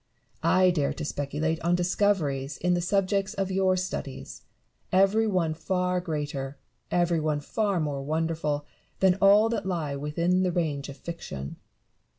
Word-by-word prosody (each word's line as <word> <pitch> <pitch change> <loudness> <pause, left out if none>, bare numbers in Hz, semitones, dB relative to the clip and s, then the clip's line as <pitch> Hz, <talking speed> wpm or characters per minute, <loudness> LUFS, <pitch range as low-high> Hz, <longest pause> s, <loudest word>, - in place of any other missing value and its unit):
I 185 -1 +4
dare 150 -5 0
to - - -5
speculate 150 +3 -2
on 170 +1 +2
discoveries 175 -7 0
in 180 +1 +1
the 175 - +1
subjects 195 +2 0
of 195 -2 -1
your 190 -1 +2
studies, 180 -7 -5 0.5
every 195 +4 +4
one 180 -6 +1
far 180 +2 -1
greater, 145 -5 -4 0.3
every 175 -1 +2
one 155 -1 0
far 200 +5 -1
more 145 -3 -2
wonderful, 155 0 -1 0.3
than 190 -1 +5
all 205 +2 +6
that 225 -5 -2
lie 160 -6 -2
within 170 +6 0
the 185 -1 +1
range 150 -5 -1
of 140 - -8
fiction. 100 - -7
170 Hz, 150 wpm, -27 LUFS, 150-185 Hz, 0.5 s, all